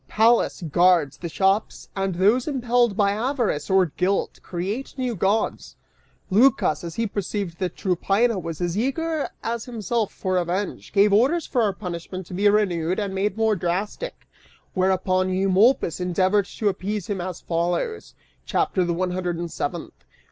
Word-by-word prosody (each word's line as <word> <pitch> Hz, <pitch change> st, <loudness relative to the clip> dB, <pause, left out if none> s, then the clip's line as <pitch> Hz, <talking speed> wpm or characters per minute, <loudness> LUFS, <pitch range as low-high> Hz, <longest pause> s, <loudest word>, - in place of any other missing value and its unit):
Pallas 225 Hz, -3 st, +3 dB
guards 170 Hz, -2 st, +3 dB
the 170 Hz, -, -5 dB
shops, 195 Hz, +5 st, 0 dB
And 195 Hz, -2 st, -1 dB
those 210 Hz, -, +3 dB
impelled 245 Hz, -6 st, +1 dB
by 200 Hz, -2 st, +3 dB
Avarice 225 Hz, -, -1 dB
or 190 Hz, -1 st, +5 dB
Guilt, 180 Hz, +5 st, -1 dB
create 195 Hz, +9 st, -4 dB
new 250 Hz, -3 st, -1 dB
Gods! 200 Hz, +4 st, -1 dB, 0.6 s
(Lycas, 215 Hz, -, +3 dB
as 170 Hz, -1 st, -6 dB
he 230 Hz, -, 0 dB
perceived 200 Hz, -3 st, -4 dB
that 185 Hz, -2 st, -2 dB
Tryphaena 195 Hz, +4 st, +1 dB
was 165 Hz, -1 st, -6 dB
as 175 Hz, 0 st, -1 dB
eager 300 Hz, +7 st, -1 dB
as 230 Hz, 0 st, -3 dB
himself 230 Hz, -2 st, -2 dB
for 185 Hz, -1 st, -1 dB
revenge, 180 Hz, +3 st, -3 dB
gave 200 Hz, 0 st, +4 dB
orders 275 Hz, +10 st, +3 dB
for 250 Hz, -, 0 dB
our 205 Hz, -3 st, +2 dB
punishment 185 Hz, -1 st, -6 dB
to 180 Hz, -, -10 dB
be 205 Hz, +3 st, +3 dB
renewed 185 Hz, -5 st, +1 dB
and 200 Hz, -3 st, -2 dB
made 200 Hz, +2 st, -1 dB
more 220 Hz, -1 st, +2 dB
drastic, 190 Hz, -, -3 dB, 0.5 s
whereupon 185 Hz, 0 st, +1 dB
Eumolpus 190 Hz, +1 st, +3 dB
endeavored 185 Hz, +3 st, +1 dB
to 210 Hz, 0 st, -1 dB
appease 200 Hz, 0 st, -3 dB
him 195 Hz, -2 st, -3 dB
as 180 Hz, -1 st, -5 dB
follows,) 175 Hz, -, -2 dB, 0.3 s
CHAPTER 185 Hz, -, +1 dB
THE 175 Hz, -1 st, -1 dB
ONE 180 Hz, +1 st, -1 dB
HUNDRED 180 Hz, -2 st, -2 dB
AND 170 Hz, -1 st, -5 dB
SEVENTH. 165 Hz, +1 st, -4 dB
195 Hz, 155 wpm, -23 LUFS, 180-220 Hz, 0.6 s, or